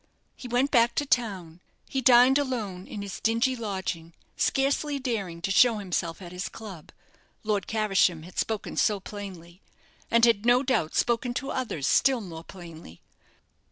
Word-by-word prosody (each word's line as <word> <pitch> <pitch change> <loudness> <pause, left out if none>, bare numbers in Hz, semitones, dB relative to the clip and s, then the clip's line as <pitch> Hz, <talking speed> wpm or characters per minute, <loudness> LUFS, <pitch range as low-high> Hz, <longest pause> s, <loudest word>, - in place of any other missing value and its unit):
He 250 - -9
went 245 +3 +1
back 235 -2 +3
to 290 - 0
town. 190 - -1 0.3
He 270 - -2
dined 255 +2 +6
alone 215 -10 -4
in 205 - -6
his 200 -2 -7
dingy 230 +4 +1
lodging, 190 -7 -5 0.2
scarcely 280 +2 0
daring 200 -10 -4
to 195 - -1
show 230 +2 +5
himself 180 -3 -3
at 175 - -9
his 180 +3 -5
club 195 -8 -10 0.5
Lord 210 -3 -1
Caversham 195 -6 +1
had 180 +2 -7
spoken 220 -2 -2
so 210 -2 +2
plainly; 185 -3 -10 0.5
and 235 0 +5
had, 225 -3 +2
no 245 +2 +4
doubt, 255 - 0
spoken 240 +1 0
to 270 +2 -3
others 225 - -3
still 265 - +3
more 165 -6 -8
plainly. 165 - -12
215 Hz, 155 wpm, -27 LUFS, 180-245 Hz, 0.5 s, dined